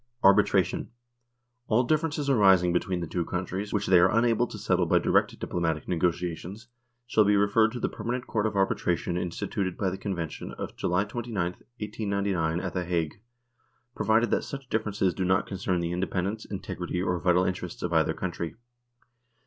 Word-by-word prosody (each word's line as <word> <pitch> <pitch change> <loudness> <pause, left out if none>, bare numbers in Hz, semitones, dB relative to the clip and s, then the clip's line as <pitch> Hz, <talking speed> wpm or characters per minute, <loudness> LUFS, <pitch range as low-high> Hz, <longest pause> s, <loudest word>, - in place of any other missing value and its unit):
Arbitration. 100 0 +4 0.8
All 115 +3 +3
differences 150 +1 0
arising 95 -9 +5
between 90 0 0
the 85 - -3
two 85 +2 -1
countries 95 +4 -4
which 100 -1 0
they 90 -1 +6
are 90 +2 +5
unable 115 +1 +3
to 110 - -8
settle 90 -4 +1
by - - +4
direct - - +2
diplomatic 80 -3 -2
negotiations 90 +5 -2 0.4
shall 110 -2 +3
be 105 0 +3
referred 105 +2 +3
to 125 - -4
the - - 0
Permanent 125 +2 -4
Court 110 -1 0
of 105 - -4
Arbitration 90 -3 0
instituted 90 +2 -2
by 95 -3 0
the 95 - -6
Convention 85 -6 -4
of - - -6
July 90 +2 +1
29, 115 +1 -5
1899, 100 -6 -2
at - - -4
the 90 - -1
Hague, 85 +1 -2 0.7
provided 115 +1 +2
that - - +2
such 135 -3 -7
differences 105 -4 0
do 95 - -2
not 95 +2 +2
concern 95 -2 -2
the 85 0 -2
independ 90 +1 -1
ence, 110 +2 -6
integrity, 90 -3 -4
or 90 -1 0
vital 90 +1 +3
interests 90 -2 -4
of 85 -1 -2
either 80 0 +2
country. 85 -2 -4
95 Hz, 170 wpm, -27 LUFS, 90-110 Hz, 0.8 s, they